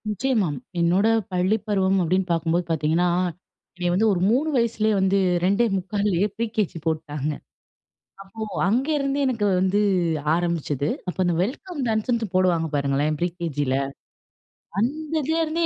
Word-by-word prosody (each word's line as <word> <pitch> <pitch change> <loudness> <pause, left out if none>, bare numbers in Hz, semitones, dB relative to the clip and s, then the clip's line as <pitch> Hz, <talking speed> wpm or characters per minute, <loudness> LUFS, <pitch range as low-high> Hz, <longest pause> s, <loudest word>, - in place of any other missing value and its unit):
நிச்சயமா. 215 -1 +1 0.3
என்னோட 180 +5 +3 0.2
பள்ளி 185 +4 +2
பருவம் 195 -2 +2
அப்டின்னு 185 +2 0
பார்க்கும்போது 170 +1 +1
பாத்தீங்கன்னா, 165 +2 +1 0.7
என்னைய 175 0 -1
வந்து 215 +5 +3
ஒரு 175 - -1
3 280 +7 +2
வயசுலயே 220 -2 +1
வந்து, 190 +1 +2 0.3
2.75 200 -1 +1
Pre 230 - 0
KG 210 -5 0
போட்டுட்டாங்க. 155 -2 -2 0.9
அப்போ 195 +3 -13 0.3
அங்கேருந்தே 275 +4 0
எனக்கு 230 -5 0
வந்து 190 +2 +2 0.6
ஆரம்பிச்சது, 165 -5 -1 0.2
அப்போ 180 - -4
அந்த 175 -1 +1
வெல்கம் 295 - -4
டான்ஸ்ன்ட்டு 220 -1 -1
போடுவாங்க 175 -3 +2
பாருங்களேன் 145 +2 0
Pre 175 - +2
KGல. 145 -6 -1 1.1
அந்ததுலருந்தே 315 +4 0
190 Hz, 120 wpm, -24 LUFS, 170-230 Hz, 1.1 s, என்னோட